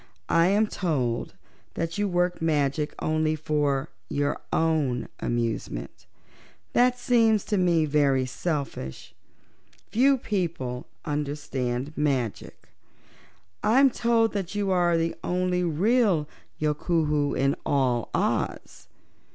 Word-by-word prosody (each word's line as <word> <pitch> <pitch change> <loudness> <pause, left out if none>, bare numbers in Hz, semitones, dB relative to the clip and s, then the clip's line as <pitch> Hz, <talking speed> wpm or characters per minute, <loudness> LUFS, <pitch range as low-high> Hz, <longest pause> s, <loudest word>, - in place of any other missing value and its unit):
I 165 +1 +4
am 205 +3 +3
told 140 - -2 0.4
that 165 +3 -3
you 205 - +1
work 175 -1 0
magic 150 -2 0
only 155 0 0
for 145 -3 0 0.2
your 145 0 -1
own 150 -7 +1
amusement. 115 - -3 0.7
That 250 0 +4
seems 225 -4 +3
to 210 - 0
me 170 -3 +3
very 140 -3 +2
selfish. 135 - -4 0.8
Few 265 +6 +4
people 165 - -3 0.2
understand 145 -2 -3
magic. 135 -7 -2 0.9
I'm 265 +4 +5
told 230 -1 +2
that 195 -1 -3
you 200 -2 0
are 175 -2 +3
the 165 0 0
only 180 0 0
real 180 0 +2 0.3
Yookoohoo 150 -1 0
in 135 +1 +2
all 125 -4 +1
Oz. - - -2
155 Hz, 105 wpm, -26 LUFS, 140-185 Hz, 0.9 s, I'm